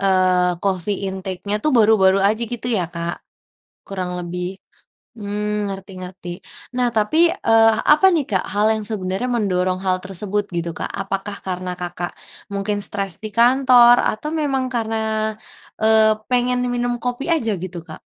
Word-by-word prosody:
eee, 185 Hz, -2 st, +3 dB
coffee 195 Hz, 0 st, -1 dB
intake-nya 190 Hz, +1 st, -3 dB
tuh 305 Hz, -, +2 dB
baru-baru 210 Hz, -4 st, +5 dB
aja 215 Hz, +4 st, +2 dB
gitu 240 Hz, +1 st, -5 dB
ya, 185 Hz, -7 st, +1 dB
Kak, 170 Hz, 0 st, -3 dB, 0.7 s
kurang 180 Hz, -2 st, -4 dB
lebih? 180 Hz, +2 st, -5 dB, 0.5 s
Mmm, 210 Hz, -1 st, -3 dB
ngerti 195 Hz, 0 st, -7 dB
ngerti. 180 Hz, -1 st, -8 dB, 0.4 s
Nah, 250 Hz, -1 st, +2 dB
tapi, 240 Hz, +10 st, +3 dB
eee, 225 Hz, -8 st, +4 dB, 0.2 s
apa 305 Hz, +6 st, +5 dB
nih, 325 Hz, -6 st, +2 dB
Kak, 190 Hz, -4 st, 0 dB
hal 205 Hz, +2 st, +1 dB
yang 215 Hz, -1 st, -3 dB
sebenarnya 200 Hz, +2 st, -2 dB
mendorong 185 Hz, -5 st, 0 dB
hal 185 Hz, -1 st, +1 dB
tersebut 200 Hz, +2 st, -2 dB
gitu, 170 Hz, 0 st, -2 dB
Kak. -, -, -4 dB
Apakah 195 Hz, +1 st, -4 dB
karena 180 Hz, -1 st, -4 dB
Kakak 175 Hz, 0 st, -5 dB, 0.4 s
mungkin 205 Hz, +1 st, -2 dB
stres 195 Hz, -4 st, -3 dB
di 215 Hz, -, -5 dB
kantor 245 Hz, +1 st, +6 dB
atau 300 Hz, +9 st, -2 dB
memang 280 Hz, -4 st, 0 dB
karena, 220 Hz, -1 st, -1 dB, 0.4 s
eee, 220 Hz, 0 st, +5 dB, 0.2 s
pengen 250 Hz, 0 st, +1 dB
minum 245 Hz, 0 st, -1 dB
kopi 245 Hz, +2 st, -4 dB
aja 245 Hz, -10 st, +1 dB
gitu, 175 Hz, -2 st, -6 dB
Kak? 155 Hz, -, -11 dB
205 Hz, 150 wpm, -20 LUFS, 185-235 Hz, 0.7 s, kantor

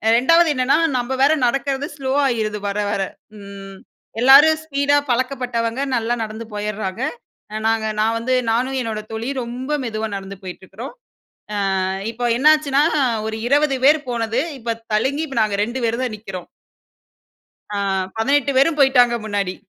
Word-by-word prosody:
2வது 330 Hz, +7 st, +5 dB
என்னன்னா 255 Hz, +3 st, +2 dB, 0.2 s
நம்ப 245 Hz, +2 st, -2 dB
வேற 290 Hz, +3 st, +5 dB
நடக்கிறது 275 Hz, +2 st, -1 dB
ஸ்லோவாயிருது 260 Hz, -6 st, 0 dB
வர 200 Hz, +1 st, -2 dB
வர. 200 Hz, -, -1 dB, 0.4 s
ம் 195 Hz, -1 st, -10 dB, 0.4 s
எல்லாரும் 295 Hz, +5 st, +7 dB
ஸ்பீடா 285 Hz, -1 st, +1 dB
பழக்கப்பட்டவங்க, 250 Hz, -1 st, -1 dB
நல்லா 235 Hz, +1 st, 0 dB
நடந்து 220 Hz, +1 st, -7 dB
போயர்றாங்க. 210 Hz, +1 st, -3 dB, 0.6 s
நாங்க 225 Hz, -1 st, +1 dB
நான் 225 Hz, +1 st, +2 dB
வந்து 250 Hz, +3 st, -1 dB, 0.2 s
நானும் 260 Hz, +3 st, 0 dB
என்னோட 220 Hz, -2 st, -3 dB
தோழியும் 245 Hz, +5 st, -3 dB
ரொம்ப 250 Hz, +4 st, -6 dB
மெதுவா 220 Hz, -2 st, -3 dB
நடந்து 195 Hz, 0 st, -7 dB
போயிட்டு 185 Hz, 0 st, -8 dB
இருக்கிறோம். 230 Hz, +9 st, -9 dB, 0.9 s
அ -, -, 0 dB, 0.3 s
இப்போ 245 Hz, +1 st, -5 dB
என்னாச்சுன்னா, 295 Hz, -1 st, +4 dB, 0.5 s
ஒரு 220 Hz, -, -4 dB
20 285 Hz, -1 st, +3 dB
பேர் 305 Hz, +2 st, +6 dB
போனது, 230 Hz, +1 st, -1 dB, 0.2 s
இப்ப 230 Hz, 0 st, -3 dB, 0.2 s
தழுங்கி 280 Hz, +8 st, 0 dB
இப்ப 270 Hz, -5 st, -4 dB
நாங்க 205 Hz, -2 st, -1 dB
2 240 Hz, +4 st, -5 dB
பேர் 230 Hz, +2 st, -1 dB
தான் 230 Hz, -4 st, -3 dB
நிக்கிறோம். 190 Hz, -4 st, -8 dB, 1.3 s
ஆ -, -, -2 dB, 0.4 s
18 280 Hz, +4 st, +1 dB
பேரும் 300 Hz, +2 st, +3 dB
போய்ட்டாங்க 250 Hz, -3 st, +5 dB
முன்னாடி. 200 Hz, -3 st, -2 dB
240 Hz, 140 wpm, -20 LUFS, 220-275 Hz, 1.3 s, எல்லாரும்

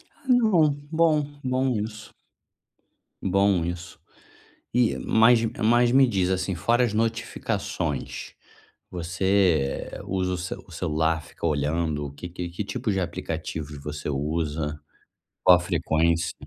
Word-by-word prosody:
Ah 280 Hz, -, -24 dB
não, 215 Hz, -, +4 dB, 0.2 s
bom, 160 Hz, -2 st, +3 dB, 0.2 s
bom 130 Hz, +1 st, +1 dB
isso. 110 Hz, +1 st, -7 dB, 1.1 s
Bom 100 Hz, -1 st, +3 dB
isso. 85 Hz, 0 st, -6 dB, 0.7 s
E, 120 Hz, -1 st, +2 dB
mas 115 Hz, +2 st, +5 dB, 0.2 s
mas 120 Hz, +2 st, +4 dB
me 135 Hz, +1 st, +6 dB
diz 95 Hz, -7 st, 0 dB
assim, 95 Hz, +1 st, 0 dB
fora 120 Hz, +9 st, +2 dB
as 120 Hz, -, +1 dB
notificações, 115 Hz, +1 st, -2 dB, 0.6 s
você 90 Hz, -3 st, +1 dB, 0.2 s
usa 95 Hz, -1 st, -1 dB
o 90 Hz, -, -2 dB
ce 90 Hz, +2 st, -4 dB, 0.2 s
celular, 80 Hz, -1 st, 0 dB
fica -, -, -6 dB
olhando 75 Hz, 0 st, 0 dB
o -, -, -7 dB
que 90 Hz, +5 st, -8 dB
que 90 Hz, 0 st, -5 dB
que 90 Hz, +4 st, -5 dB
tipos 110 Hz, +1 st, -2 dB
de 95 Hz, -, 0 dB
aplicativos 80 Hz, -3 st, -4 dB
você 75 Hz, 0 st, -5 dB
usa, 75 Hz, +1 st, -2 dB, 0.6 s
qual 90 Hz, -1 st, +8 dB
a -, -, -3 dB
frequência? 85 Hz, -1 st, +1 dB
90 Hz, 130 wpm, -25 LUFS, 80-115 Hz, 1.1 s, qual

